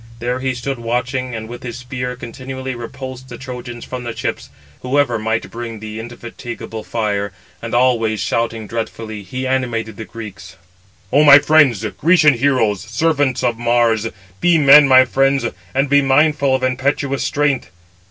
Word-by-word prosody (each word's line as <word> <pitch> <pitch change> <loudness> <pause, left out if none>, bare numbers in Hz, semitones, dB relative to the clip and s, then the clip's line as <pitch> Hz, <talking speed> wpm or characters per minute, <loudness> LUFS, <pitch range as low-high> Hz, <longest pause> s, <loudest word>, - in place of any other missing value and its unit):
There 120 +2 -2
he 130 -1 -2
stood 130 +1 -4
watching, 125 +2 -2
and 110 0 -6
with 120 +1 -9
his 120 -2 -6
spear 125 0 -5
continually 130 +2 -6
repulsed 130 +2 -8
the - - -8
Trojans 125 -2 -8
from 125 -1 -6
the 120 -1 -5
ships, - - -4 0.3
whoever 130 -2 +1
might 110 +1 -2
bring 115 -2 -6
the 110 +1 -7
indefatigable 120 -1 -8
fire; 105 -3 -2 0.3
and 115 +1 -4
always 115 -4 +2
shouting 115 +2 -1
dreadfully, 110 -1 -5
he 125 +7 -5
animated 120 -5 -2
the 110 - -6
Greeks: 100 -7 -10 0.6
"O 145 +2 +6
my 145 -1 +10
friends, 145 -7 +4
Grecian 160 -3 +4
heroes, 115 -6 +1
servants 135 +3 0
of 120 -2 0
Mars, 115 -2 +2 0.3
be 175 -1 +4
men, 145 0 +8
my 130 -1 +7
friends, 135 +2 +1 0.3
and 135 +2 +2
be 145 +1 +4
mindful 140 0 +3
of 130 - -3
impetuous 135 +2 0
strength. 145 -8 0
125 Hz, 155 wpm, -18 LUFS, 115-135 Hz, 0.6 s, my